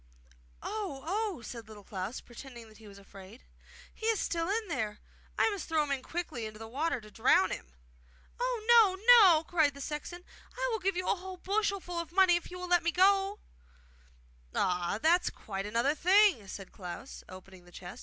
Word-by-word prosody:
'Oh, 395 -11 -5
oh!' 390 - -2
said 230 0 -8
Little 210 -2 -12
Klaus, 195 +4 -5
pretending 240 -1 -11
that 215 - -18
he 220 - -14
was 200 -1 -13
afraid. 195 +3 -14 0.5
'He 440 - -5
is 450 -2 +2
still 335 +1 -1
in 430 +1 -1
there! 220 - -3 0.4
I - - +4
must 400 -4 -6
throw 315 -2 +2
him 280 -2 -2
quickly 260 -9 -5
into 215 0 -10
the 225 +1 -9
water 285 +5 -1
to 215 -1 -15
drown 215 -5 +3
him!' 60 0 -7 0.6
'Oh! 470 -4 +4
no, 405 - -17
no!' 345 -7 +6
cried 315 -4 +1
the - - -10
sexton. 310 +5 -6 0.3
'I - - -1
will 445 - -1
give 380 -1 -1
you 365 - -2
a - - +3
whole 375 0 -8
bushelful 390 -3 -2
of 335 -2 -6
money 370 -1 +5
if 345 - -4
you 360 - -8
will 360 0 -6
let 350 -1 +4
me 340 - 0
go!' 390 +3 +3 1.2
'Ah, 180 +1 0
that's 340 +7 +3
quite 195 -1 -6
another 235 +7 +1
thing!' 365 - +4
said 195 0 -8
Little - - -24
Klaus, 185 +8 -8
opening 185 -1 -13
the 175 - -17
chest. 175 0 -10
320 Hz, 195 wpm, -31 LUFS, -, 1.2 s, no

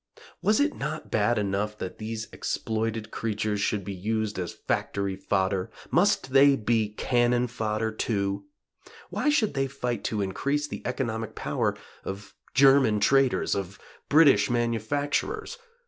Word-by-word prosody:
Was 215 +1 +3
it 295 +1 +2
not 155 +2 -5
bad 110 +2 +2
enough 105 +1 -1
that 95 - -6
these 110 0 -4
exploited 110 0 -2
creatures 105 -2 -2
should 100 -2 0
be 100 - -4
used 105 +2 -2
as 90 -2 -3 0.2
factory 100 -1 -1
fodder? 95 0 0 0.2
Must 175 -7 +2
they 140 0 +7
be 110 -2 +1
cannon 120 0 +2
fodder 110 -2 -2
too? 100 -3 -2 0.7
Why 300 - +1
should 235 - +2
they 135 -1 0
fight 125 -3 -3
to 105 -2 0
increase 140 +10 -1
the - - -6
economic 115 -4 -3
power - - -1 0.3
of 100 +2 -7 0.2
German 135 -5 +5
traders? 135 +5 +3
of 100 0 -4 0.3
British 145 -2 +6
manufacturers? 145 - -1
115 Hz, 135 wpm, -27 LUFS, 105-135 Hz, 0.7 s, they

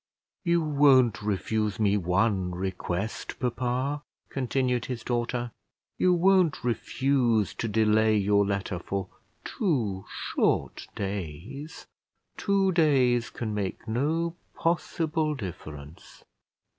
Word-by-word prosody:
"You 170 -2 +2
won't 140 -7 +4
refuse 105 0 -1
me 105 -2 +3
one 95 0 +1
request, 95 +2 -3
papa?" 130 +3 -1 0.3
continued 125 -2 0
his 125 -3 -5
daughter; 120 0 -1 0.5
"you 185 - +4
won't 180 -2 +3
refuse 120 -2 +1
to 115 - -3
delay 110 0 +3
your 100 0 +3
letter 100 -2 -2
for 95 +1 -4 0.4
two 115 - -1
short - - -1
days? 100 - -5 0.5
Two 195 -2 +2
days 130 -8 +3
can 110 -3 -4
make 105 +2 -3
no 160 +9 0 0.2
possible 160 -2 0
difference." 80 - -9
120 Hz, 100 wpm, -27 LUFS, 100-145 Hz, 0.5 s, won't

